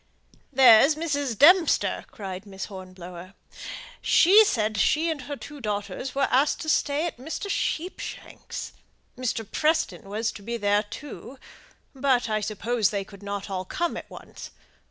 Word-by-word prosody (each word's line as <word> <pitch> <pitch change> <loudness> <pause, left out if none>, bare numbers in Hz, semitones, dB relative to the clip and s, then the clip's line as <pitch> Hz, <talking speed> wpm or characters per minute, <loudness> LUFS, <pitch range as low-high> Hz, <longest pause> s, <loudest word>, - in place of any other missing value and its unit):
"There's 265 +2 +7
Mrs. 285 -7 -2
Dempster," 345 - +5
cried 195 -1 -7
Miss 195 -1 -6
Hornblower; 185 -1 -10 0.7
"she 400 +6 +7
said 215 - 0
she 325 +8 +2
and 300 -3 -4
her 285 +3 -6
two 290 +1 -10
daughters 205 +4 -4
were 275 0 +2
asked 280 +4 +2
to 315 - -4
stay 290 0 +1
at 340 - -4
Mr. 315 +10 -5
Sheepshanks'. 350 +4 -4 0.4
Mr. 240 -3 -2
Preston 300 - 0
was 220 +3 -1
to 205 - -11
be 235 +3 -4
there, 205 -1 +2
too; 265 +4 -9 0.6
but 265 -3 +1
I 215 0 +1
suppose 215 +1 0
they 200 -2 -2
could 200 0 -15
not 200 0 -5
all 190 -2 -3
come 340 - -2
at - - -8
once. - - -10
235 Hz, 150 wpm, -26 LUFS, 200-290 Hz, 0.7 s, There's